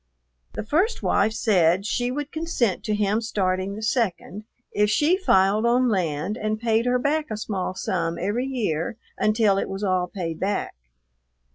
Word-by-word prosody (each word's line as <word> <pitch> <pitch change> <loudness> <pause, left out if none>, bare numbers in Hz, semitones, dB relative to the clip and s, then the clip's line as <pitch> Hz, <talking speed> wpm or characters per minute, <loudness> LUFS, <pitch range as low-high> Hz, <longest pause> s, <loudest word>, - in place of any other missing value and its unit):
The - - -4
first 360 - 0
wife 210 +2 +2
said 190 -4 +2
she 245 +3 -1
would 290 +3 -4
consent 315 - -1
to 215 - 0
him 210 +1 +1
starting 190 -3 -1
the 215 - -7
second, 215 -3 -1 0.3
if 210 0 +2
she 300 - +3
filed 205 - +3
on 245 +1 +3
land 180 0 -1
and 215 -1 -2
paid 230 +1 +1
her 250 0 +3
back 300 +4 0
a 215 - -3
small 190 -3 -3
sum 170 -3 -2
every 210 +8 -1
year 220 -7 -2 0.2
until 215 -2 +3
it - - -3
was 195 +2 -5
all 185 -2 +1
paid 170 -4 -5
back. 200 +1 -1
210 Hz, 165 wpm, -24 LUFS, 190-240 Hz, 0.3 s, she